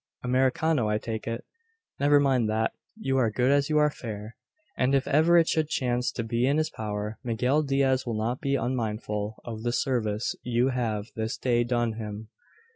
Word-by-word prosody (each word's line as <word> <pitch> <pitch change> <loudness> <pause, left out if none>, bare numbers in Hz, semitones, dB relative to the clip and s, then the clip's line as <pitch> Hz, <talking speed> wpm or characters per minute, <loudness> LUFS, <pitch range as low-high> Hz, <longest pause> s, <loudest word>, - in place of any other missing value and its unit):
Americano, 130 +1 +2
I 105 - +2
take 110 0 -5
it. 115 0 -4 0.5
Never 145 +1 +5
mind 130 -5 +2
that. 110 +1 0 0.2
You 135 -11 0
are 115 -3 +3
good 125 +5 +1
as 140 0 +2
you 155 - +2
are 150 0 +4
fair; 110 -4 -7 0.4
and 130 +2 +2
if 135 - +1
ever 160 +4 +5
it 165 -1 +5
should 155 -1 +1
chance 125 -3 0
to 115 - -3
be 115 +2 0
in 140 +2 +2
his 155 0 0
power, 105 0 -4
Miguel 125 +5 +1
Diaz 135 -2 +1
will 115 -3 -3
not 115 +4 -2
be 140 -1 +1
unmindful 110 -4 -2
of 110 -2 -6
the 120 +1 -1
service 115 -4 0
you 125 +1 +1
have 115 -5 -1
this 110 +2 -2
day 120 -2 +2
done 120 -1 0
him." 105 0 -6
120 Hz, 190 wpm, -27 LUFS, 110-135 Hz, 0.5 s, Never